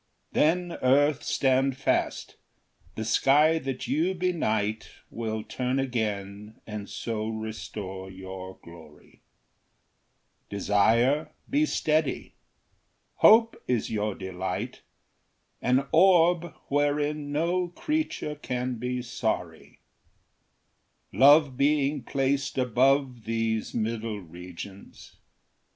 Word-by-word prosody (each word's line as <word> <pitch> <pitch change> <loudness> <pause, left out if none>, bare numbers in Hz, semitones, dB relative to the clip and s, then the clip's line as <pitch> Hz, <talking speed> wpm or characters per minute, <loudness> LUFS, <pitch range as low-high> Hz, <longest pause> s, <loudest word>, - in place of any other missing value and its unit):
Then 175 +2 +1
earth, 140 +3 +3
stand 135 0 +1
fast; 140 - -1 0.6
the 110 - -4
sky 150 +8 +4
that 135 -3 -5
you 170 +6 +1
benight 110 - -1 0.2
Will 110 -1 -3
turn 125 +3 -2
again 105 -5 -3
and 105 -2 -7
so 110 -2 -4
restore 105 -3 -6
your 95 0 -9
glory; 80 -3 -16 1.3
Desire, 110 +8 +2 0.2
be 300 +2 +2
steady; 155 - 0 0.8
hope 225 +1 +6
is 120 -3 0
your 105 -2 -1
delight, 95 -2 -5 0.8
An 130 +2 +2
orb 175 -1 +4 0.2
wherein 145 +1 0
no 175 +4 0
creature 300 - -2
can 125 -4 -4
be 125 +1 -3
sorry, 120 - -4 1.3
Love 145 0 +6
being 145 0 +2
placed 140 +2 -1
above 130 0 +2
these 115 -1 -2
middle 110 -1 -2
regions. 90 +2 -11
125 Hz, 90 wpm, -27 LUFS, 110-150 Hz, 1.3 s, hope